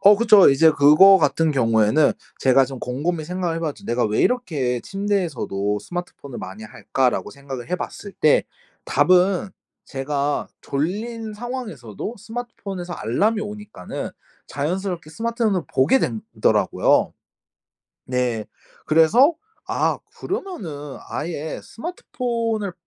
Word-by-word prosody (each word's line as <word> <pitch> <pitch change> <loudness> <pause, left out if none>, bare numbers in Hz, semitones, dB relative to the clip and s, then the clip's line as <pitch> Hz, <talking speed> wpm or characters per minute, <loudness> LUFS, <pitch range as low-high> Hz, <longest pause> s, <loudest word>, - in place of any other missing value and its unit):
어 205 +1 +8
그쵸. 210 -5 +7
이제 160 +4 +5
그거 155 +7 +7
같은 160 +2 +2
경우에는 115 +1 +3 0.3
제가 130 0 +4
좀 130 0 -8
곰곰이 155 +7 -2
생각을 175 0 -2
해 - - -3
봤죠. 155 -3 -4
'내가 120 +1 +1
왜 105 0 +1
이렇게 145 - 0
침대에서도 165 - -2
스마트폰을 175 -6 -7
많이 95 +4 -8
할까?'라고 125 +3 -1
생각을 135 -1 -8
해 180 - +1
봤을 200 +2 -7
때 155 - +3 0.4
답은 185 +1 +3 0.3
제가 140 +1 -2
졸린 215 +10 -3
상황에서도 220 - -6
스마트폰에서 210 -6 -6
알람이 210 - 0
오니까는 210 - -6 0.4
자연스럽게 175 +2 -3
스마트폰을 225 -2 -1
보게 135 - +4
된 115 - -2 0.2
더라고요. - - +3 0.9
네. 125 -4 -1 0.4
그래서 220 - +5 0.3
아 - - 0 0.2
그러면은 180 - -5
아예 155 0 -4
스마트폰을 230 - -3
165 Hz, 290 characters per minute, -22 LUFS, 135-210 Hz, 0.9 s, 어